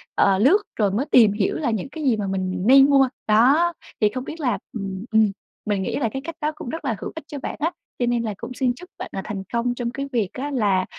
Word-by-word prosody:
ờ, 195 -1 +4
lướt 275 - +6 0.2
rồi 205 -3 +2
mới 225 +8 0
tìm 225 -4 +7
hiểu 205 -2 0
là 285 -7 0
những 220 +4 -3
cái 310 +2 -7
gì 250 -6 +3
mà 205 -2 -2
mình 185 -1 -2
nên 270 +2 +8
mua. 270 -2 +5 0.2
Đó, 275 +11 +4 0.3
thì 210 - +5
không 255 +3 -5
biết 320 - -8
là 250 -8 0 0.2
ừm, 195 -2 -5
ừm, 220 -2 +4 0.3
mình 205 -2 0
nghĩ - - -2
là 235 -6 0
cái 270 - -3
cách 330 -1 -5
đó 300 +1 0
cũng 250 - -7
rất 320 +2 -5
là 230 - 0
hữu - - -5
ích 320 - -6
cho 290 - -6
bạn - - -5
á 325 +4 0 0.3
cho 245 - +2
nên 240 -1 +1
là 215 -2 -2
cũng 255 - -7
xin 250 -1 +1
chúc 360 +7 -13
bạn - - -6
là 195 - -3
thành 200 -2 -5
công 240 +1 0
trong 240 -1 -3
cái 275 +2 -4
việc 220 -6 0
á 280 +3 -4
là 200 -8 +2
240 Hz, 275 wpm, -23 LUFS, 210-275 Hz, 0.3 s, nên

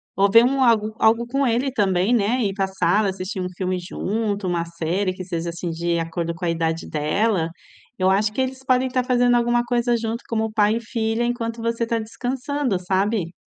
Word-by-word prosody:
Ou 200 +1 +3
ver 230 +2 +8
um 270 +1 +2
algo 220 -2 +2
algo 225 +2 +3
com 275 +2 0
ele 250 +3 +1
também, 195 0 +1
né, 235 +3 +1
ir 195 -2 0
pra 195 -1 0
sala, 190 +2 +1
assistir 190 +2 -5
um 180 - -3
filme 185 -1 -1
junto, 205 +2 -2
uma 175 -1 0
série 170 +3 -2
que 185 - -7
seja, 170 -2 -3
assim, 170 +1 -4
de 170 +1 -1
acordo 165 +1 -3
com 175 +2 -6
a - - +1
idade 165 0 -1
dela. 165 +3 0 0.5
Eu 185 0 +3
acho 205 +2 +2
que 260 - -1
eles 260 0 -3
podem 255 -1 +2
estar 255 0 0
fazendo 245 -1 +3
alguma 240 0 +2
coisa 240 0 +1
junto 230 +1 -4
como 220 -1 -1
pai 215 +1 +2
e - - -5
filha, 225 0 -1
enquanto 230 -1 -2
você 230 0 -1
está 230 0 0
descansando, 250 0 -2
sabe. 190 0 -1
215 Hz, 205 wpm, -22 LUFS, 185-240 Hz, 0.5 s, ver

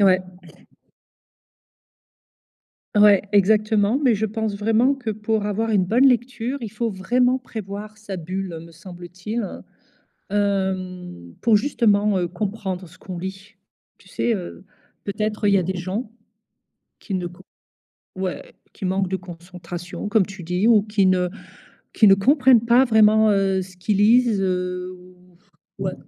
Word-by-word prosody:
Ouais. 190 -2 +5 2.8
Ouais, 205 -1 +6
exactement, 210 +3 +3
mais 245 -5 +4
je 215 +2 -1
pense 220 -1 -2
vraiment 225 +6 +2
que 250 -5 -5
pour 215 0 -2
avoir 220 +2 -1
une 195 -4 +2
bonne 245 +8 +3
lecture, 245 +1 0
il 215 - -6
faut 225 +1 -2
vraiment 245 +7 +1
prévoir 215 -3 -8
sa 205 -3 -7
bulle 180 0 -5
me 170 - -15
semble-t-il, 180 +5 -6 0.8
hem, 185 - -2
pour 225 -2 +4
justement, 210 -5 +2
heu, 175 - 0
comprendre 190 0 -4
ce 175 - -19
qu'on 185 -2 -8
lit. 190 +4 -8 0.4
Tu - - -21
sais? 235 - -1
Heu, 185 0 -7 0.4
peut-être 210 +1 -2
il 200 - +4
y 195 - +5
a - - +1
des 185 +2 -3
gens 190 +6 -4 0.9
qui 195 - -6
ne 180 -1 -2
c 175 - -8 0.8
ouais, 185 -1 -5 0.2
«qui - - -9
manquent 190 0 0
de 190 - -1
concentration» 175 +1 -8
comme 210 -3 +3
tu 190 -3 -10
dis 180 +6 +1
ou 220 -3 +5
qui 210 -2 +1
ne 180 -1 +2 0.6
qui 215 - +4
ne 195 - +8
comprennent 255 +2 +4
pas 240 +3 +5
vraiment, 220 -2 +4
heu, 195 -1 +1
ce 185 0 -13
qu'ils 195 +3 -1
lisent, 225 -1 +4
heu, 180 0 -2 0.9
ouais. - - -3
200 Hz, 145 wpm, -22 LUFS, 185-220 Hz, 2.8 s, ne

